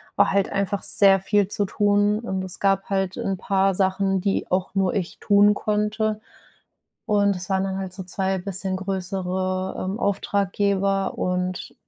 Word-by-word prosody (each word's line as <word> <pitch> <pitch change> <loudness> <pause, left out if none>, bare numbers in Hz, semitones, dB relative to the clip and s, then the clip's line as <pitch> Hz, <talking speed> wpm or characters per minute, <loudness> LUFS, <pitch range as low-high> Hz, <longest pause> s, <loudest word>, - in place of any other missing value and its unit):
war - - +3
halt 200 0 +1
einfach 200 0 -1
sehr 195 -2 +5
viel 200 +1 +1
zu 205 -1 0
tun 205 +1 +2
und 190 -5 -3
es 185 0 -4
gab 195 -1 +1
halt 195 -1 -1
'n 195 -1 -2
paar 195 0 +1
Sachen, 190 0 +1
die 200 0 -1
auch 185 +1 -1
nur 190 -1 +1
ich 185 -4 -3
tun 205 -3 +5
konnte. 210 +1 -1 0.9
Und 200 -1 +2
das 180 +2 -6
waren 190 0 +1
dann 190 0 -3
halt 190 -1 -5
so 190 - -6
2 190 +1 -1
bisschen 190 0 -3
größere, 185 0 -3
ähm, 190 +4 -3
Auftraggeber 200 0 0
und 180 0 -3
195 Hz, 160 wpm, -23 LUFS, 190-200 Hz, 0.9 s, sehr